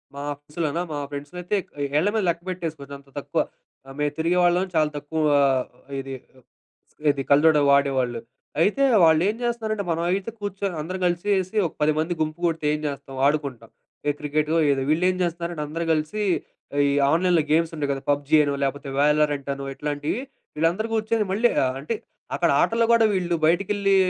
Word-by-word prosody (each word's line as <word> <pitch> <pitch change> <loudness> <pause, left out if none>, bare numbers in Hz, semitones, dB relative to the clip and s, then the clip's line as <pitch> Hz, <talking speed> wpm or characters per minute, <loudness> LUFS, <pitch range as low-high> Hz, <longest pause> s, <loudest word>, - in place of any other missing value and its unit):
మా 140 - -6
ఆఫీస్‌ 145 +2 -20
లోనా 160 +3 -1
మా - - -3
ఫ్రెండ్స్‌లో 145 +5 -7
అయితే 180 +4 0 0.4
ఏళ్ళ 165 - +2
మీద 215 - +1
లెక్కపెట్టేసుకోవచ్చు. 165 -5 -4
అంత 140 0 -22
తక్కువ. - - -1 0.4
ఆ - - -14
మేము 145 -1 +1
తిరిగేవాాళ్ళం 175 +2 +2
చాలా 155 -1 +3
తక్కువ 155 +2 -3 0.2
ఆహ్, 130 -2 +2 0.3
ఇది 135 0 -6 1.0
ఏది 140 -1 +1
కళ్ళ 145 +2 +5
జోడు 155 -2 +5
వాడేవాళ్ళు. 135 -4 +2 0.4
అయితే 215 +10 +3 0.2
వాళ్ళేం 165 +7 +4
జేస్తున్నారంటే 220 -3 -1
మనమయితే 180 +6 -1
కూర్చొని 200 -2 -3
అందరం 185 +4 -5
కలిసేసి 185 +2 0
ఒక - - -12
10 150 0 +3
మంది 160 +3 0
గుంపు 155 +1 -2
గుడితే 165 -2 -1
ఏం 150 - -2
జేస్తాం? 135 -1 -6
ఆడుకుంటాం. 140 -6 -1 0.4
ఏ - - +4
క్రికెట్టో 150 +2 0 0.2
ఏదో, 135 -1 0
వీళ్ళేం 180 +4 +2
జేస్తున్నారంటే 170 -2 -2
అందరూ 165 +3 -3
కలిసి 155 +7 -2 0.7
ఈ - - +2 0.2
ఆన్‌లైన్‌లో 170 -1 +3
గేమ్స్ 165 +1 +3
ఉంటాయి 145 -2 -2
గదా! 135 - -3
పబ్జీ 145 +2 +1
అనో, 145 -1 0
లాకపోతే 140 +1 -2
వయలర్ 150 +1 +4
అంటనో 140 0 -5
ఇట్లాంటియి 145 - -2 0.4
వీళ్ళందరూ 170 +8 +1
కూర్చొని 220 0 +1
మళ్ళీ 225 +5 +3
ఆహ్, 130 0 0
అంటే 190 +11 -2 0.4
అక్కడ 170 -1 +2
ఆటల్లో 230 0 +2
గూడా 230 -1 +5
వీళ్ళు 175 -3 0
బయటికెళ్ళి 195 +4 +2
160 Hz, 160 wpm, -24 LUFS, 145-185 Hz, 1.0 s, కళ్ళ